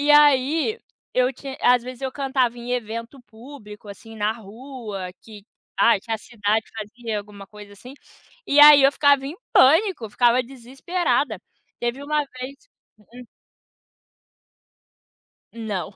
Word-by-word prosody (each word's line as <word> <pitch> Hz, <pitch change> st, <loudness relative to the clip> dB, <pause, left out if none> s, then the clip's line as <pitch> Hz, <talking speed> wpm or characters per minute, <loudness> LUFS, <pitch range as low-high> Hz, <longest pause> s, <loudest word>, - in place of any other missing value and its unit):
E 290 Hz, +1 st, +1 dB
aí, 295 Hz, -, +4 dB, 0.3 s
eu 255 Hz, +1 st, +1 dB
ti 275 Hz, -, -11 dB
às 245 Hz, -1 st, +4 dB
vezes, 255 Hz, +1 st, -10 dB
eu 265 Hz, -1 st, -3 dB
cantava 260 Hz, -4 st, -1 dB
em 240 Hz, +1 st, -8 dB
evento 230 Hz, +2 st, -5 dB
público, 220 Hz, -2 st, -13 dB
assim, 225 Hz, +3 st, -12 dB
na 210 Hz, 0 st, 0 dB
rua 220 Hz, -3 st, -9 dB
que 210 Hz, -3 st, -14 dB, 0.3 s
ai, 235 Hz, -, +4 dB
tinha 225 Hz, +3 st, -4 dB
cidade 220 Hz, -1 st, -2 dB
que -, -, -25 dB
fazia 220 Hz, +1 st, -5 dB
alguma 205 Hz, -1 st, -11 dB
coisa, 210 Hz, -1 st, -13 dB
assim. 245 Hz, +6 st, -13 dB, 0.5 s
E 290 Hz, -3 st, +4 dB
aí, 295 Hz, -1 st, +9 dB
eu 275 Hz, -, +5 dB
ficava 285 Hz, -2 st, +3 dB
em 300 Hz, +5 st, -7 dB, 0.2 s
pânico. 320 Hz, -, +4 dB
Ficava 240 Hz, +3 st, +2 dB
desesperada. 270 Hz, +8 st, -3 dB, 0.4 s
Teve 240 Hz, +3 st, -3 dB
uma 300 Hz, +1 st, 0 dB, 0.2 s
vez 260 Hz, +2 st, -6 dB
que -, -, -33 dB, 0.3 s
Hum. 245 Hz, +4 st, -14 dB, 2.3 s
Não. 210 Hz, -4 st, -5 dB
245 Hz, 140 wpm, -22 LUFS, 215-275 Hz, 2.3 s, aí